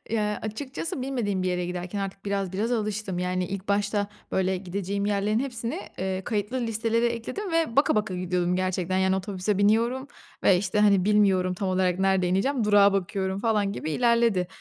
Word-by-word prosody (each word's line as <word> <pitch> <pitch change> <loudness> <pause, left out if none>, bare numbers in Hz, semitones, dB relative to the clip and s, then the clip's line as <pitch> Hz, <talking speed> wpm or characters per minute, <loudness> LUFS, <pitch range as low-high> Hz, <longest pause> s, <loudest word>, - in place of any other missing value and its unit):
Ya, 210 -2 0
açıkçası 260 +6 -4
bilmediğim 225 -8 -1
bir 185 - 0
yere 180 -1 -1
giderken 180 +2 -4
artık 195 0 -5
biraz 195 -2 -2
biraz 215 +5 -1
alıştım. 210 -4 -2
Yani, 180 0 -1
ilk 195 +1 -6
başta 205 0 +1 0.3
böyle 190 0 +1
gideceğim 200 +2 -3
yerlerin 210 +2 +1
hepsini, 250 - -3 0.2
eee, 190 0 -2
kayıtlı 220 +3 -2
listelere 230 +1 0
ekledim 235 - -4
ve 330 -8 +1
baka 280 - +4
baka 210 -3 0
gidiyordum 180 0 0
gerçekten. 185 0 -1
Yani, 190 0 +2
otobüse 190 +1 -2
biniyorum 230 +6 +2 0.4
ve, 185 - +6
işte, 195 +2 -1
hani, 200 -3 +4
bilmiyorum 195 -3 +3
tam 190 +1 -2
olarak 185 -1 +1
nerede 190 -1 +2
ineceğim? 220 +7 +1
Durağa 205 -1 +5
bakıyorum 190 0 -1
falan 210 -2 +1
gibi 160 - -4
ilerledi. 235 -3 +2
200 Hz, 175 wpm, -26 LUFS, 185-225 Hz, 0.4 s, ve